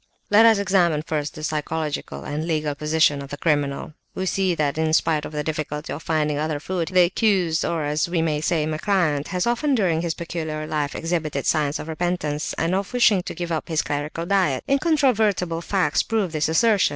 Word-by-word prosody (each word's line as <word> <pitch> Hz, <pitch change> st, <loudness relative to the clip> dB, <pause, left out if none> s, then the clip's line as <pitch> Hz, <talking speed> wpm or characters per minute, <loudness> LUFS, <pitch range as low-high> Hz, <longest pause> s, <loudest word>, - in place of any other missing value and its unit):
"Let 220 Hz, +2 st, +7 dB
us 225 Hz, -2 st, +5 dB
examine 180 Hz, -6 st, +2 dB
first 150 Hz, -2 st, -3 dB
the 155 Hz, -, -8 dB
psychological 155 Hz, 0 st, -3 dB
and 150 Hz, +3 st, -4 dB
legal 155 Hz, -3 st, 0 dB
position 150 Hz, -1 st, +2 dB
of 140 Hz, -, -9 dB
the 145 Hz, -, -6 dB
criminal. 145 Hz, -2 st, -1 dB, 0.2 s
We 190 Hz, -, -2 dB
see 190 Hz, -1 st, +1 dB
that 150 Hz, -1 st, -1 dB
in 160 Hz, 0 st, +1 dB
spite 155 Hz, -1 st, +2 dB
of -, -, -7 dB
the 150 Hz, -1 st, -3 dB
difficulty 150 Hz, -1 st, -4 dB
of 155 Hz, -, -6 dB
finding 150 Hz, -2 st, 0 dB
other 155 Hz, -1 st, -1 dB
food, 175 Hz, +1 st, -3 dB
the 185 Hz, -1 st, +4 dB
accused, 180 Hz, -3 st, +1 dB
or, 165 Hz, -2 st, -1 dB
as 150 Hz, +3 st, 0 dB
we 175 Hz, -1 st, 0 dB
may 155 Hz, -2 st, 0 dB
say, 155 Hz, -1 st, +1 dB
my 155 Hz, 0 st, -3 dB
client, 160 Hz, -7 st, +1 dB
has 180 Hz, -1 st, -1 dB
often 250 Hz, +4 st, +1 dB
during 175 Hz, -8 st, +1 dB
his 170 Hz, -2 st, -2 dB
peculiar 160 Hz, -3 st, -4 dB
life 150 Hz, -2 st, -2 dB
exhibited 160 Hz, -4 st, -2 dB
signs 150 Hz, -1 st, +1 dB
of 155 Hz, -, -7 dB
repentance, 160 Hz, -2 st, -2 dB
and 165 Hz, +2 st, -1 dB
of 195 Hz, +4 st, -2 dB
wishing 230 Hz, -6 st, +4 dB
to -, -, -7 dB
give 175 Hz, -1 st, -4 dB
up 160 Hz, -, -2 dB
this 160 Hz, -2 st, 0 dB
clerical 150 Hz, +3 st, -3 dB
diet. 180 Hz, -8 st, +1 dB
Incontrovertible 225 Hz, -, +2 dB
facts 180 Hz, -5 st, +1 dB
prove 215 Hz, -6 st, -1 dB
this 155 Hz, -1 st, 0 dB
assertion. 205 Hz, +5 st, +3 dB
160 Hz, 200 wpm, -23 LUFS, 150-185 Hz, 0.2 s, Let